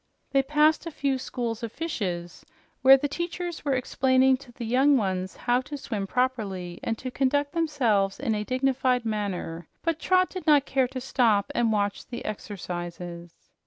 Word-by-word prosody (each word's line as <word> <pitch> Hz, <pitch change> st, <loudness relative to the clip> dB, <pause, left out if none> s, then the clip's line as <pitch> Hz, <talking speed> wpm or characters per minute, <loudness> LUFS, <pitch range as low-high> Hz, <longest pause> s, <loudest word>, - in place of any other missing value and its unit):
They 275 Hz, -, +4 dB
passed 300 Hz, +4 st, +2 dB
a -, -, -2 dB
few 275 Hz, -3 st, -1 dB
schools 235 Hz, -3 st, -4 dB
of 230 Hz, -2 st, -4 dB
fishes, 190 Hz, -, -4 dB, 0.4 s
where 270 Hz, +1 st, +9 dB
the 290 Hz, -, -1 dB
teachers 345 Hz, +2 st, -4 dB
were 280 Hz, -2 st, +1 dB
explaining 260 Hz, +1 st, +3 dB
to 255 Hz, -2 st, -15 dB
the 240 Hz, 0 st, -7 dB
young 265 Hz, +5 st, +4 dB
ones 190 Hz, -4 st, -2 dB
how 245 Hz, +1 st, +1 dB
to 290 Hz, +3 st, -7 dB
swim 210 Hz, -7 st, -4 dB
properly, 200 Hz, -8 st, -2 dB
and 225 Hz, -, -1 dB
to 255 Hz, +2 st, -6 dB
conduct 285 Hz, +2 st, +1 dB
themselves 245 Hz, -, +1 dB
in 250 Hz, -4 st, 0 dB
a 210 Hz, 0 st, -1 dB
dignified 255 Hz, 0 st, +1 dB
manner, 190 Hz, -6 st, -3 dB, 0.2 s
but 330 Hz, -2 st, 0 dB
Trot 370 Hz, +1 st, +3 dB
did 370 Hz, -2 st, -7 dB
not 290 Hz, -2 st, +5 dB
care 265 Hz, -2 st, +1 dB
to 260 Hz, +1 st, -6 dB
stop 230 Hz, -6 st, +2 dB
and 235 Hz, -2 st, +2 dB
watch 205 Hz, -1 st, -1 dB
the 240 Hz, -, -7 dB
exercises. 175 Hz, -4 st, -6 dB
250 Hz, 170 wpm, -26 LUFS, 205-275 Hz, 0.4 s, where